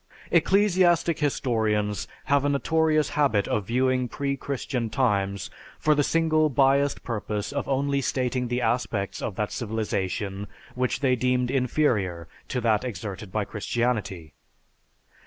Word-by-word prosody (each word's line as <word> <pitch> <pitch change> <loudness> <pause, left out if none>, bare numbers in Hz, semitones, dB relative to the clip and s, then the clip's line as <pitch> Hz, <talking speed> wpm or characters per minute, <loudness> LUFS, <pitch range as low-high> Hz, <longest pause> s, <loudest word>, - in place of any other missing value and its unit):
Ecclesiastic 180 -5 +3
historians 110 -8 0 0.2
have 140 -1 +2
a 145 - +2
notorious 155 +1 +2
habit 135 -9 +2
of 105 -3 -1
viewing 130 +1 +1
pre 140 +3 -2
Christian 130 -4 -3
times 100 -6 0 0.3
for 155 - +3
the 145 - +2
single 155 0 +2
biased 140 +1 +2
purpose 105 -3 -3
of 140 - -2
only 140 +1 +1
stating 125 -1 -1
the 125 +1 -1
aspects 110 -4 -1
of 105 - -3
that 105 +1 -2
civilization 100 -3 -3 0.3
which 125 +2 -1
they 130 -2 +3
deemed 125 0 +1
inferior 115 - 0 0.2
to 125 - -2
that 110 -2 +2
exerted 100 -4 -6
by 105 0 -1
Christianity. 105 -7 -2
125 Hz, 130 wpm, -26 LUFS, 105-140 Hz, 0.3 s, Ecclesiastic